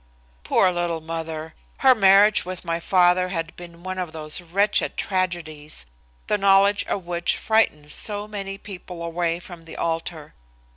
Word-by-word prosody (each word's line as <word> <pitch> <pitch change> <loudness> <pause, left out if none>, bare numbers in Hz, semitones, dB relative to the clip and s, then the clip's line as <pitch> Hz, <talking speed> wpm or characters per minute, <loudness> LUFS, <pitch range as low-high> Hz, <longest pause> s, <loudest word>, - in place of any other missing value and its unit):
Poor 185 - +3
little 175 -2 -1
mother! 160 0 -5 0.2
Her 265 -1 +6
marriage 200 -1 +5
with 185 0 -7
my 165 0 -1
father 180 +1 +3
had 165 -3 -4
been 170 -1 -12
one 185 0 -4
of 175 -3 -4
those 155 +1 -4
wretched 195 +5 +1
tragedies, 165 - -3 0.4
the 210 - 0
knowledge 200 +1 +4
of 190 - -3
which 175 0 +1
frightens 150 -10 +2
so 205 -1 -1
many 195 -2 -5
people 180 -4 -9
away 170 0 -1
from 175 -2 -12
the 165 - -10
altar. 165 - -3
175 Hz, 150 wpm, -23 LUFS, 165-195 Hz, 0.4 s, Her